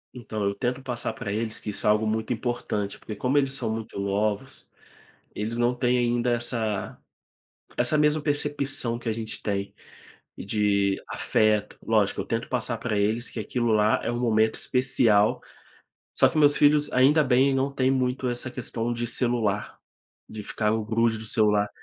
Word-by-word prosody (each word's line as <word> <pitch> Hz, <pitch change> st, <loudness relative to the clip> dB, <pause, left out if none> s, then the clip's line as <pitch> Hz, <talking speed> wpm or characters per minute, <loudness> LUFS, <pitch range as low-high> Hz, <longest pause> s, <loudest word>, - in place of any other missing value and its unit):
Então, 110 Hz, -4 st, -5 dB
eu 100 Hz, 0 st, +1 dB
tento 125 Hz, +6 st, -3 dB
passar 125 Hz, -2 st, -3 dB
para 105 Hz, -5 st, -5 dB
eles 110 Hz, +1 st, -2 dB
que 105 Hz, -, -5 dB
isso 105 Hz, -, -2 dB
é -, -, +6 dB
algo 105 Hz, +1 st, +3 dB
muito 110 Hz, +2 st, -1 dB
importante, 115 Hz, -4 st, -3 dB
porque 105 Hz, -, -7 dB
como 125 Hz, +7 st, -1 dB
eles 135 Hz, -1 st, +2 dB
são 115 Hz, -4 st, -2 dB
muito 110 Hz, -3 st, -6 dB
novos, 105 Hz, +5 st, -2 dB, 0.7 s
eles 110 Hz, +3 st, -3 dB
não 120 Hz, +1 st, +2 dB
têm 125 Hz, 0 st, +1 dB
ainda 120 Hz, 0 st, +1 dB
essa 115 Hz, -3 st, -2 dB, 0.8 s
essa 125 Hz, +5 st, +1 dB
mesma 150 Hz, 0 st, +2 dB
percepção 145 Hz, -5 st, 0 dB
que 120 Hz, -, -6 dB
a 110 Hz, -, +1 dB
gente 110 Hz, 0 st, -5 dB
tem, 100 Hz, -1 st, -3 dB, 0.6 s
de 100 Hz, -1 st, +1 dB
afeto, 105 Hz, -1 st, +1 dB
lógico, 110 Hz, -3 st, +1 dB
eu -, -, -6 dB
tento 115 Hz, 0 st, -2 dB
passar 125 Hz, -2 st, -1 dB
para 115 Hz, -2 st, -2 dB
eles 110 Hz, +4 st, 0 dB
que -, -, -6 dB
aquilo 120 Hz, +1 st, -1 dB
lá 105 Hz, 0 st, +3 dB
é 115 Hz, -, -1 dB
um 120 Hz, -, -3 dB
momento 110 Hz, -2 st, +2 dB
especial, 120 Hz, -5 st, +2 dB, 0.7 s
só -, -, +4 dB
que -, -, -2 dB
meus 145 Hz, -1 st, +5 dB
filhos, 145 Hz, 0 st, +4 dB
ainda 140 Hz, +5 st, +5 dB
bem, 135 Hz, 0 st, +3 dB
não 135 Hz, +1 st, 0 dB
têm 130 Hz, -1 st, +1 dB
muito 130 Hz, -1 st, 0 dB
essa 120 Hz, +1 st, -3 dB
questão 120 Hz, -1 st, -3 dB
de 120 Hz, 0 st, -2 dB
celular, 120 Hz, -5 st, -1 dB, 0.5 s
de 110 Hz, -1 st, -7 dB
ficar 105 Hz, +1 st, -1 dB
o 110 Hz, -1 st, -1 dB
grude 110 Hz, 0 st, +1 dB
de 110 Hz, -, -7 dB
celular. 105 Hz, -2 st, +2 dB
115 Hz, 175 wpm, -25 LUFS, 105-125 Hz, 0.8 s, é